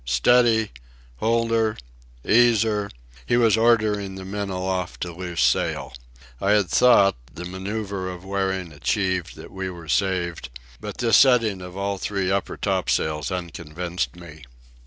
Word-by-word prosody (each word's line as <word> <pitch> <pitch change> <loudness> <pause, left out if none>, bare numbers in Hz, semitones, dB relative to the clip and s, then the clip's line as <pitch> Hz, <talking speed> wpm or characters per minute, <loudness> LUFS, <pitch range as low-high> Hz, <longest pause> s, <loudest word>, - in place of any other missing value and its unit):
Steady! 110 - +3 0.5
Hold 115 - +1
her! 110 -1 +1 0.5
Ease 115 -1 +5
her!" 105 -2 -1 0.4
he 120 - +3
was 115 -3 +4
ordering 110 -4 +2
the 95 0 -8
men 100 +1 -4
aloft 95 -1 -3
to 90 - -3
loose 90 -1 -2
sail. - - 0 0.5
I 100 +1 +3
had 105 -4 +2
thought, 100 - +5
the 85 +7 -8
manoeuvre 95 0 -4
of 90 +1 -10
wearing 95 -3 -2
achieved, 90 +3 -1
that - - -11
we 95 -1 -4
were 85 -3 -10
saved, 85 -7 -1 0.3
but - - -7
this 115 -2 +4
setting 115 -7 +4
of 90 +1 -9
all 100 0 -2
three 95 -2 -1
upper 100 0 -2
topsails 80 -6 -1
unconvinced 85 0 -4
me. 85 -3 -12
95 Hz, 145 wpm, -23 LUFS, 90-110 Hz, 0.5 s, Ease